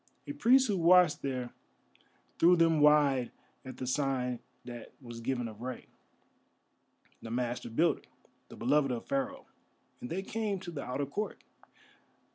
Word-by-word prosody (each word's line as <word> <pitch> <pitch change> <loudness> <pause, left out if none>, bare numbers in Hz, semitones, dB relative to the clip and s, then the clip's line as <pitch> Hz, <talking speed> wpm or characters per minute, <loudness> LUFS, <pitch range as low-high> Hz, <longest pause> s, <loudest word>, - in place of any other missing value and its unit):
A - - -5
priest 265 -1 +4
who 205 -3 0
watched 175 -1 +5
there 130 -3 -3 0.9
threw 175 +2 +6
them 165 -2 +3
wide 145 -4 +4 0.3
at 130 -1 -9
the 130 - -4
sign 130 -2 -1 0.3
that 120 -2 -9
was 120 -3 -9
given 125 0 -2
of 110 0 -11
Rei, 125 0 -6 1.4
the 115 - -8
Master 120 +1 -2
Builder, 160 +9 +2 0.5
the - - -11
beloved 140 +3 +2
of 120 -2 -3
Pharaoh, 275 0 -2 0.5
and 250 -1 -7
they 190 +2 -3
came 210 -1 -2
to 175 - -7
the 145 -4 -5
outer 130 +3 -2
court. 205 +10 -5
140 Hz, 145 wpm, -31 LUFS, 125-180 Hz, 1.4 s, threw